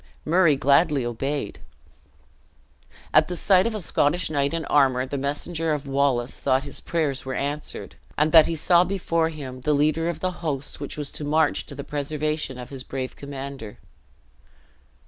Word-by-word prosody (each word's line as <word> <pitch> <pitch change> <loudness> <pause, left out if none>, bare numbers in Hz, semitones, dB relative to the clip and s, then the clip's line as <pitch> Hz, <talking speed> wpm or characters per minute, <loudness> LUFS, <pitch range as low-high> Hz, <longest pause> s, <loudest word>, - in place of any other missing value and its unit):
Murray 170 -2 +4
gladly 140 0 +3
obeyed. 135 0 -3 1.5
At - - +5
sight 190 +3 +4
of 225 - -3
a 210 - -3
Scottish 160 +1 +1
knight 140 -2 +1
in 165 -1 -3
armor, 130 -3 +3
the 135 - -5
messenger 155 +3 -1
of 145 -1 -3
Wallace 135 -3 0
thought 130 -1 +1
his 140 - -5
prayers 150 -5 -1
were 130 0 -4
answered, 145 +3 -4 0.2
and 150 +1 +2
that 160 -1 +8
he 165 - -2
saw 170 +3 +4
before 170 -3 0
him 135 -5 -8
the 150 +4 +1
leader 155 +3 +1
of 170 - -4
the 185 - -1
host 145 -4 -3
which 145 +1 -6
was 145 -2 -4
to - - -6
march 155 +1 +1
to 140 - -9
the 140 - -6
preservation 150 -1 -3
of 125 +1 -9
his 135 -2 -7
brave 130 0 -5
commander. 135 -5 -7
145 Hz, 165 wpm, -24 LUFS, 135-160 Hz, 1.5 s, that